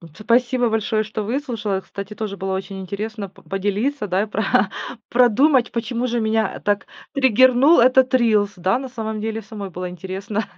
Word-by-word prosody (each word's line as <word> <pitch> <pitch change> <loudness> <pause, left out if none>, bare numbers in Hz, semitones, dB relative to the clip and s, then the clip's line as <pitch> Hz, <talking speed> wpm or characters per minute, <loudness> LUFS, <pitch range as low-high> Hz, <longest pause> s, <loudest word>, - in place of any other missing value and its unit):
Спасибо 240 +4 +2
большое, 220 0 0
что 215 0 -4
выслушала, 220 -5 -2
кстати, 200 +2 -8
тоже 210 -2 -4
было 190 0 -3
очень 195 0 -5
интересно 205 +2 -5
п 190 - -20
поделиться, 205 +6 -2
да, 190 +2 +1
и - - -2
про 200 -2 +1 0.4
продумать, 250 +2 +4
почему 235 +1 -2
же 240 -1 -1
меня 220 -2 0
так 205 0 0 0.3
триггернул 260 +3 +5
этот 260 +1 +4
рилс. 215 -5 +3
Да, 185 +6 +1
на 265 - -6
самом 220 -3 -5
деле 225 +1 -3
самой 210 -2 -7
было 180 0 -5
интересно. 190 +4 -4
220 Hz, 165 wpm, -21 LUFS, 200-240 Hz, 0.4 s, триггернул